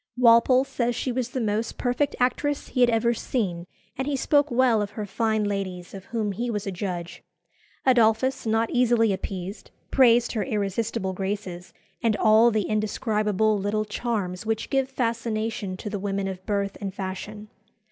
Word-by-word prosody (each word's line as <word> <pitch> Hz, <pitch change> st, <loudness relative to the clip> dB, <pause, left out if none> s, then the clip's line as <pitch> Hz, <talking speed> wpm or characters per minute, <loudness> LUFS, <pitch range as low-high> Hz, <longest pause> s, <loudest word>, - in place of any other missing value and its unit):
Walpole 250 Hz, +2 st, +6 dB
says 245 Hz, -3 st, -1 dB
she 255 Hz, -, -2 dB
was 245 Hz, -1 st, -2 dB
the 260 Hz, -, -3 dB
most 220 Hz, 0 st, -1 dB
perfect 250 Hz, +3 st, 0 dB
actress 285 Hz, +3 st, 0 dB
he 250 Hz, -, -1 dB
had 245 Hz, -, +6 dB
ever 235 Hz, +1 st, +2 dB
seen; 185 Hz, -8 st, -2 dB, 0.3 s
and 265 Hz, +1 st, -3 dB
he 290 Hz, -, 0 dB
spoke 290 Hz, +2 st, +2 dB
well 245 Hz, -3 st, +3 dB
of 205 Hz, -, -2 dB
her 210 Hz, -, -2 dB
fine 220 Hz, +1 st, 0 dB
ladies, 190 Hz, -3 st, -3 dB
of 195 Hz, -1 st, -9 dB
whom 220 Hz, -2 st, -2 dB
he 235 Hz, +5 st, -3 dB
was 210 Hz, -3 st, -3 dB
a 195 Hz, -, -2 dB
judge. 180 Hz, -2 st, -5 dB, 0.6 s
Adolphus, 245 Hz, 0 st, +3 dB
not 225 Hz, +1 st, +1 dB
easily 240 Hz, -4 st, +3 dB
appeased, 190 Hz, +1 st, -6 dB, 0.2 s
praised 240 Hz, -2 st, +5 dB
her 220 Hz, -, -1 dB
irresistible 210 Hz, -2 st, -2 dB
graces 190 Hz, -2 st, -4 dB, 0.3 s
and 225 Hz, -3 st, +2 dB
"all 220 Hz, +2 st, +6 dB
the 215 Hz, -2 st, 0 dB
indescribable 215 Hz, 0 st, 0 dB
little 210 Hz, +2 st, -1 dB
charms 205 Hz, -4 st, -3 dB
which 220 Hz, 0 st, -2 dB
give 270 Hz, -1 st, +1 dB
fascination 225 Hz, -5 st, -2 dB
to 210 Hz, -, -7 dB
the 205 Hz, -1 st, -3 dB
women 195 Hz, 0 st, -2 dB
of 185 Hz, -1 st, -6 dB
birth 200 Hz, -1 st, -1 dB
and 195 Hz, -1 st, -4 dB
fashion." 205 Hz, +2 st, -6 dB
220 Hz, 165 wpm, -25 LUFS, 200-240 Hz, 0.6 s, Walpole